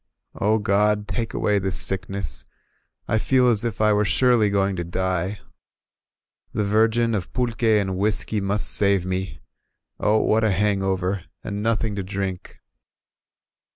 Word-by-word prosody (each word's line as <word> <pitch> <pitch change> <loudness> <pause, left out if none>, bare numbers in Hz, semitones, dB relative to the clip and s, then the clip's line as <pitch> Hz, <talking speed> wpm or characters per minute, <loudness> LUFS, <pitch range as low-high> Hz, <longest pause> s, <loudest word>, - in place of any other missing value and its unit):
"0 110 +2 +2
God, 105 0 +1
take 115 -2 -4
away 105 -1 +1
this 95 -1 -2
sickness, 95 -2 -2 0.6
I 110 - +1
feel 130 +2 +2
as 110 -2 +5
if 115 -5 -3
I 110 0 +4
were 105 0 +2
surely 115 0 +3
going 100 -1 0
to 85 - -2
die 95 +3 -2 0.5
— - - -51
The 105 - 0
Virgin 115 +3 +2
of 95 -5 -3
ptdqv^ 115 -3 +1
and 95 -2 -2
whisky 105 +1 0
must 100 +2 +1
save 100 -3 +3
me: 95 +1 -4 0.6
O 105 +1 +2
what 110 +1 +2
a 110 - +3
hangover, 95 -2 -1 0.2
and 100 0 -4
nothing 110 -1 -1
to - - -1
drink! 95 -1 -5
105 Hz, 150 wpm, -23 LUFS, 95-110 Hz, 0.6 s, as